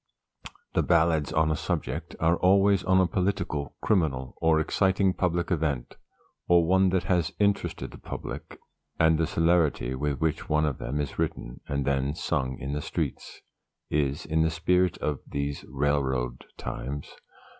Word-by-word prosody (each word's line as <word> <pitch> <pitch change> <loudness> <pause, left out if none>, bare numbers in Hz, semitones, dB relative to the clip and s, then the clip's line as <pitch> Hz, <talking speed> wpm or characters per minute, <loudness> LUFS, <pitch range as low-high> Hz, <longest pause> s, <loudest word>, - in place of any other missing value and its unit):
The - - +3
"Ballads 80 -4 +2
on 80 0 +2
a - - +1
Subject" - - -3
are 85 +1 +3
always 100 +1 +4
on 95 0 +4
a 95 - +5
political, 90 -6 -2
criminal, 75 - 0
or 80 -1 +4
exciting 95 +4 +2
public 90 -1 -1
event, 75 -7 -1 0.5
or 85 -1 +5
one 95 +2 +4
that 95 0 +1
has 85 -4 +1
interested 100 -1 0
the - - -12
public, - - -7 0.4
and 80 0 +4
the 80 - +2
celerity 80 -7 +2
with 70 +1 -2
which 80 -1 -1
one 75 0 +3
of 75 -4 -2
them 70 +4 -3
is 70 -2 -4
written, - - -3
and 70 -1 -1
then 70 +1 0
sung 65 -5 -1
in 70 +2 -4
the 75 - -2
streets, - - -4 0.5
is 70 +1 0
in 80 0 +1
the 80 - +3
spirit 90 +2 +1
of 75 -3 -2
"these 70 0 -3
railroad 65 -3 -1
times." 70 +3 -6
80 Hz, 155 wpm, -27 LUFS, 70-90 Hz, 0.5 s, a